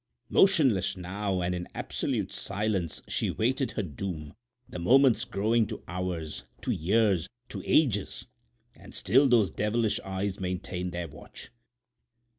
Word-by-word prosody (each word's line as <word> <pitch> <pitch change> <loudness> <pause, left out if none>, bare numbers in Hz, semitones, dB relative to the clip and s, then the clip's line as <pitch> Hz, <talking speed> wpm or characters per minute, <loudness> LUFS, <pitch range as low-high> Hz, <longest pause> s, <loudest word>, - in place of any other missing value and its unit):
Motionless 135 - +4
now 95 +1 -2
and 90 +1 0
in 90 0 -4
absolute - - -2
silence, 100 -4 -2
she - - 0
awaited 130 +2 0
her 110 - -1
doom, 80 -3 -5 0.3
the 90 - -7
moments 120 +4 +5
growing 110 +1 +1
to - - -7
hours, 90 -4 -4 0.2
to - - -1
years, 95 0 +2 0.2
to - - -5
ages; 115 -11 +2 0.5
and - - -12
still 130 +9 +4
those 115 -5 +4
devilish 110 +1 0
eyes 95 +1 -3
maintained 90 -1 -3
their 85 -1 -4
watch. 75 0 -10
100 Hz, 130 wpm, -28 LUFS, 90-115 Hz, 0.5 s, moments